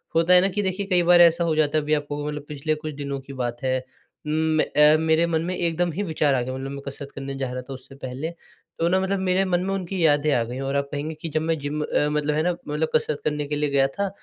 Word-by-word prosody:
होता 165 +2 +4
है 180 - +9
ना 190 - +4
कि 200 +2 -2
देखिए 190 +1 -2
कई 180 -2 +3
बार 175 0 +6
ऐसा 170 0 +5
हो 165 -2 +1
जाता 155 0 +2
है 155 - +2
अभी 150 +1 0
आप 150 -1 +1
कहोगे 145 0 -4
मतलब 150 -1 -7
पिछले 150 +1 -2
कुछ 155 0 -6
दिनों 140 -1 -4
की 135 +1 -11
बात 120 -1 -4
है 130 0 +1 0.5
उम 155 +1 +1
म - - +4 0.2
अ, 150 +1 +7
मेरे 160 +1 +3
मन 160 -1 0
में 185 +1 -2
एकदम 175 0 0
ही 190 +6 -3
विचार 155 -5 +1
आ 125 - +1
गए, 125 +1 -4
मतलब 135 +1 -5
मैं 140 - -6
कसरत 140 0 -6
करने 140 0 -5
जा 130 -2 -3
रहा 125 0 -4
था 130 +2 -9
उससे 130 +1 -12
पहले, 135 +3 -5 0.5
तो 165 - +1
ना 185 +2 +3
मतलब 190 +1 -1
मेरे 190 0 +1
मन 180 -2 +1
में 195 +1 -2
उनकी 185 -2 -1
यादें 145 0 +3
आ 120 - +2
गई 120 +3 -6
और 135 +1 -2
आप 140 0 0
कहेंगीं 150 +2 -4
कि 165 - -4
जब 155 +1 -1
मैं 165 0 0
जिम 145 +2 -3
अ, - - -1 0.2
मतलब 150 0 0
है 155 - +1
ना, 180 - +2 0.2
मतलब 150 +2 -1
कसरत 155 -1 +1
करने 150 -1 -1
के 150 - -2
लिए 150 0 0
गया 135 -1 +3
था, 200 +8 -3
150 Hz, 290 wpm, -24 LUFS, 140-170 Hz, 0.5 s, है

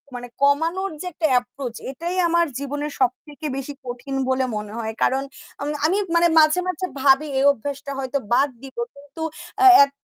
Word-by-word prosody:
মানে 245 0 -6
কমানোর 325 +7 +2
যে - - -6
একটা 315 0 +1
এপ্রোচ 245 0 -7 0.2
এটাই 340 +6 -4
আমার 340 0 +3
জীবনের 290 +1 -4
সবথেকে 290 +4 -2
বেশি 275 +2 -5
কঠিন 250 +2 -5
বলে 260 0 +2
মনে 210 0 -6
হয়। 220 -1 -3
কারণ 265 +1 +2 0.4
আম 285 - -2 0.2
আমি 360 +5 +2 0.2
মানে 340 0 +5
মাঝে, 310 +3 +5
মাঝে 365 0 -2 0.2
ভাবি 275 +2 +5
এই 275 - +3
অভ্যাসটা 280 +3 -6
হয়তো 265 +1 -1 0.2
বাদ 280 +3 +4
দিবো। 270 - -6
কিন্তু 285 +3 -9 0.4
আ - - +7 0.2
এত 280 0 -19
280 Hz, 175 wpm, -22 LUFS, 260-315 Hz, 0.4 s, আ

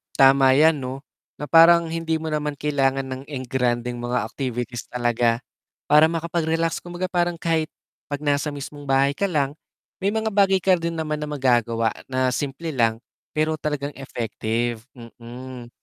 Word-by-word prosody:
Tama 135 -1 +6
yan 155 +1 +5
'no. 130 +2 -6 0.3
Na 150 - -6
parang 170 +1 +7
hindi 165 -1 -1
mo 160 0 -5
naman 150 -1 -2
kailangan 135 -2 +1
ng 130 0 -6
engrandeng 125 -2 -2
mga 120 +1 -1
activities 125 -3 -4
talaga. 120 -1 +1 0.5
Para 150 +1 +7
makapag-relax 165 0 -1
kumbaga 175 +1 -5
parang 175 -1 +1
kahit 160 -1 0 0.4
pag 145 +1 -5
nasa 145 +1 +1
mismong 145 0 -8
bahay 135 +1 +3
ka 200 +7 0
lang, 145 -5 0 0.5
may 195 - +2
mga 220 0 0
bagay 195 -1 +4
ka 185 -1 +4
din 165 0 -3
naman 155 -1 -2
na 150 - -4
magagawa 120 -5 +1 0.2
na 130 -1 +1
simple 145 +5 -3
lang. 115 -3 +2 0.4
Pero 155 +1 +1
talagang 150 -1 -3
effective, 115 -2 -3 0.2
hmm. 120 +1 -10
140 Hz, 150 wpm, -23 LUFS, 125-160 Hz, 0.5 s, parang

